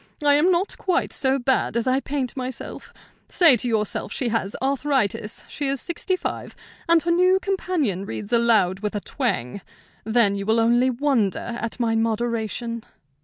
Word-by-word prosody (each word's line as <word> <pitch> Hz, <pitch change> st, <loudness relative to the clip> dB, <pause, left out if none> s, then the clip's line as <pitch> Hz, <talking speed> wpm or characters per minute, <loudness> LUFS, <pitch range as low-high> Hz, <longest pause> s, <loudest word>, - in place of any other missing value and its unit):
I 290 Hz, -, +6 dB
am 300 Hz, +5 st, +4 dB
not 360 Hz, +3 st, -1 dB
quite 365 Hz, -3 st, 0 dB
so 265 Hz, -1 st, +1 dB
bad 260 Hz, -2 st, 0 dB
as 235 Hz, -, 0 dB
I 260 Hz, +1 st, +2 dB
paint 275 Hz, -3 st, -3 dB
myself; 255 Hz, -2 st, -6 dB, 0.4 s
say 330 Hz, -8 st, +6 dB
to 240 Hz, -, -4 dB
yourself 215 Hz, -3 st, -1 dB
she 245 Hz, +2 st, -1 dB
has 220 Hz, -3 st, -1 dB
arthritis, 265 Hz, -6 st, -1 dB
she 290 Hz, -, -3 dB
is 275 Hz, 0 st, -1 dB
sixty 365 Hz, +5 st, -2 dB
five, -, -, -5 dB, 0.3 s
and 335 Hz, 0 st, +6 dB
her 340 Hz, -, 0 dB
new 365 Hz, +2 st, +4 dB
companion 325 Hz, -, -1 dB
reads 210 Hz, +3 st, -6 dB
aloud 220 Hz, -6 st, +3 dB
with 210 Hz, 0 st, -3 dB
a 205 Hz, -, -2 dB
twang; 200 Hz, -, -2 dB, 0.4 s
then 220 Hz, -2 st, +3 dB
you 200 Hz, 0 st, -4 dB
will 220 Hz, +1 st, +3 dB
only 240 Hz, +3 st, +3 dB
wonder 240 Hz, -4 st, 0 dB
at 230 Hz, +2 st, -4 dB
my 230 Hz, -2 st, +1 dB
moderation." 230 Hz, 0 st, -2 dB
240 Hz, 170 wpm, -23 LUFS, 220-285 Hz, 0.4 s, I